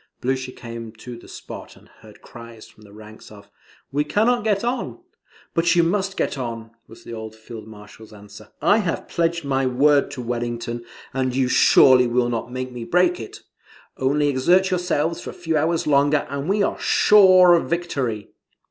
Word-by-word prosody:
Blucher 130 0 -2
came 115 -2 -9
to 120 +2 -10
the 120 - -14
spot, - - -10
and - - -20
heard - - -17
cries 115 -1 -12
from - - -22
the 105 -1 -16
ranks 110 +1 -14
of 105 -1 -15 0.4
"We 145 +2 0
cannot 225 +9 +1
get 210 -2 0
on." 245 +1 -3 0.6
"But 170 +1 +2
you 170 - +4
must 195 +3 -1
get 140 - -2
on," 115 -2 -6 0.2
was 115 - -15
the 115 - -9
old 110 -1 -8
Field 110 -1 -11
Marshal's 105 +1 -14
answer. 105 0 -14 0.2
"I 210 - +4
have 180 -6 -3
pledged 170 -1 -1
my 135 -1 0
word 140 +3 +3
to 125 - -6
Wellington, 120 0 -4 0.3
and 130 -1 -1
you 130 -1 +1
surely 125 0 +5
will 120 0 0
not 120 0 -4
make 130 0 -5
me 120 -1 -7
break 180 +6 +1
it. 110 - -10 0.5
Only 145 +3 0
exert 175 +8 +2
yourselves 175 -2 -1
for - - -8
a - - -8
few 165 -2 -3
hours 160 +2 0
longer, 145 0 +2
and 140 +4 -4
we 200 +1 +2
are - - -2
sure 185 -4 +6
of 170 - +1
victory." 140 -11 -3
130 Hz, 185 wpm, -22 LUFS, 115-170 Hz, 0.6 s, sure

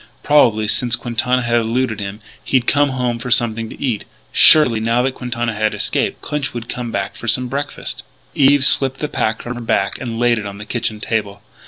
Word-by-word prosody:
Probably, 115 -8 +3
since 120 +2 +2
Quintana 125 +1 -1
had 120 0 +2
eluded 115 0 -1
him, 100 +1 -6 0.2
he'd 130 -2 +1
come 145 +2 +2
home 125 -2 -2
for 125 - -6
something 115 -2 +1
to - - -11
eat.... 120 -7 -2 0.3
Surely, 135 -8 +6
now 115 +2 +1
that 135 0 -1
Quintana 120 -2 -3
had 110 0 -1
escaped, - - -2
Clinch 145 -4 -3
would 120 -1 -6
come 120 -2 -5
back - - -3
for 120 - -9
some 125 +3 +2
breakfast. 140 +3 -4 0.3
Eve 140 0 +4
slipped 135 -1 +3
the 150 - -2
pack 110 -6 -2
from 120 - -5
her 120 - -7
back 100 -4 -1
and 115 -3 -4
laid 120 -1 +2
it 105 - -7
on 100 0 -8
the 105 - -8
kitchen 110 -1 -3
table. 105 -3 -3
120 Hz, 205 wpm, -18 LUFS, 110-130 Hz, 0.3 s, Surely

